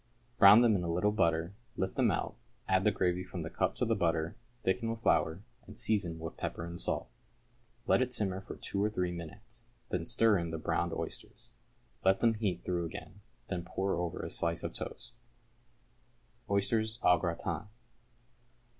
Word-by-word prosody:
Brown 105 Hz, +2 st, +10 dB
them 115 Hz, -3 st, +5 dB
in 95 Hz, -, 0 dB
a 85 Hz, -, -1 dB
little 90 Hz, +5 st, +2 dB
butter, 85 Hz, -3 st, +1 dB, 0.2 s
lift 95 Hz, 0 st, -1 dB
them -, -, +3 dB
out, -, -, -1 dB, 0.3 s
add 95 Hz, 0 st, +3 dB
the 105 Hz, -, +5 dB
gravy 90 Hz, -2 st, 0 dB
from -, -, -6 dB
the -, -, -5 dB
cup -, -, 0 dB
to -, -, 0 dB
the 115 Hz, -, +2 dB
butter, 85 Hz, -4 st, 0 dB, 0.3 s
thicken 95 Hz, +5 st, +1 dB
with 115 Hz, 0 st, -4 dB
flour, 80 Hz, +5 st, +2 dB, 0.2 s
and -, -, -11 dB
season 100 Hz, -7 st, 0 dB
with 80 Hz, 0 st, -7 dB
pepper 85 Hz, -, -3 dB
and 85 Hz, 0 st, -4 dB
salt. -, -, 0 dB, 0.8 s
Let -, -, +4 dB
it 125 Hz, -1 st, 0 dB
simmer 95 Hz, -5 st, 0 dB
for -, -, -8 dB
two 100 Hz, 0 st, -2 dB
or 105 Hz, -, +2 dB
three 90 Hz, -4 st, -1 dB
minutes, 105 Hz, +8 st, -9 dB, 0.2 s
then 85 Hz, -2 st, -2 dB
stir 110 Hz, -4 st, +4 dB
in 85 Hz, -1 st, -3 dB
the 80 Hz, -, -3 dB
browned 80 Hz, -, 0 dB
oysters; -, -, -5 dB, 0.5 s
let 95 Hz, 0 st, +4 dB
them 115 Hz, -1 st, +4 dB
heat 100 Hz, -5 st, -2 dB
through 85 Hz, -2 st, -1 dB
again, 95 Hz, +4 st, -8 dB, 0.3 s
then 90 Hz, -2 st, -3 dB
pour 95 Hz, +2 st, -1 dB
over 85 Hz, 0 st, -3 dB
a -, -, -4 dB
slice 85 Hz, 0 st, -1 dB
of -, -, -3 dB
toast. 120 Hz, +1 st, -6 dB, 1.3 s
=Oysters, 110 Hz, +3 st, +1 dB
au 90 Hz, -1 st, +6 dB
Gratin. 85 Hz, +4 st, -3 dB
95 Hz, 180 wpm, -32 LUFS, 85-105 Hz, 1.3 s, Brown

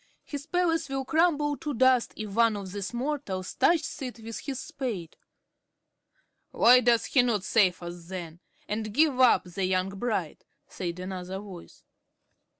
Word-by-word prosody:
His 285 Hz, +1 st, -7 dB
palace 330 Hz, -4 st, +1 dB
will 270 Hz, -1 st, -2 dB
crumble 300 Hz, -2 st, +2 dB
to 295 Hz, -3 st, -4 dB
dust, 255 Hz, 0 st, +3 dB
if 215 Hz, -2 st, -5 dB
one 230 Hz, -1 st, +3 dB
of 195 Hz, -2 st, -7 dB
these 200 Hz, 0 st, -4 dB
mortals 240 Hz, -8 st, -3 dB
touches 335 Hz, -4 st, +1 dB
it 250 Hz, -2 st, -5 dB
with 225 Hz, 0 st, -7 dB
his 275 Hz, -3 st, -5 dB
spade." 210 Hz, -, -5 dB, 1.3 s
"Why 250 Hz, +2 st, +6 dB
does 240 Hz, -2 st, +3 dB
he 270 Hz, -, +4 dB
not 230 Hz, -6 st, 0 dB
save 185 Hz, -4 st, +2 dB
us 175 Hz, 0 st, -8 dB
then, 175 Hz, -2 st, -7 dB, 0.3 s
and 215 Hz, 0 st, -4 dB
give 295 Hz, -3 st, +3 dB
up 255 Hz, -2 st, +5 dB
the 180 Hz, +2 st, -5 dB
young 185 Hz, 0 st, +1 dB
bride?" 195 Hz, -5 st, -3 dB, 0.2 s
said 175 Hz, -1 st, -5 dB
another 185 Hz, 0 st, -5 dB
voice. 195 Hz, -4 st, -11 dB
225 Hz, 150 wpm, -28 LUFS, 185-270 Hz, 1.3 s, Why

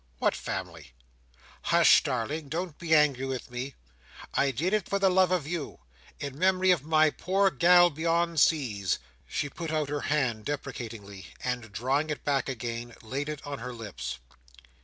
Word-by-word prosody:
"What -, -, +2 dB
family?" 85 Hz, -8 st, -6 dB, 0.7 s
"Hush, -, -, +6 dB
darling. 140 Hz, +5 st, -3 dB
Don't 170 Hz, +1 st, -3 dB
be 160 Hz, -2 st, +3 dB
angry 140 Hz, -3 st, +3 dB
with 130 Hz, -1 st, -5 dB
me. 125 Hz, +2 st, -5 dB, 0.6 s
I 140 Hz, -, +2 dB
did 160 Hz, -, -1 dB
it 210 Hz, -4 st, 0 dB
for 200 Hz, -, +1 dB
the 195 Hz, -1 st, +3 dB
love 185 Hz, 0 st, +4 dB
of 180 Hz, -5 st, 0 dB
you. 160 Hz, -1 st, -4 dB, 0.4 s
In 140 Hz, 0 st, -6 dB
memory 185 Hz, 0 st, +4 dB
of 175 Hz, -6 st, +3 dB
my 155 Hz, 0 st, +4 dB
poor 195 Hz, +4 st, +1 dB
gal 175 Hz, +4 st, +6 dB
beyond 165 Hz, +1 st, +1 dB
seas." 115 Hz, -, +2 dB, 0.3 s
She 145 Hz, -, -2 dB
put 165 Hz, +3 st, -6 dB
out 155 Hz, -2 st, -1 dB
her 145 Hz, 0 st, -2 dB
hand 125 Hz, -8 st, 0 dB
deprecatingly, 110 Hz, -9 st, -6 dB, 0.2 s
and 125 Hz, -3 st, -3 dB
drawing 135 Hz, +8 st, 0 dB
it 150 Hz, -, -4 dB
back 140 Hz, -2 st, 0 dB
again, 120 Hz, -1 st, -5 dB
laid 135 Hz, +6 st, -3 dB
it 150 Hz, -1 st, -6 dB
on 145 Hz, -2 st, -5 dB
her 125 Hz, +1 st, -6 dB
lips. 80 Hz, -, -6 dB
145 Hz, 165 wpm, -28 LUFS, 120-165 Hz, 0.7 s, Hush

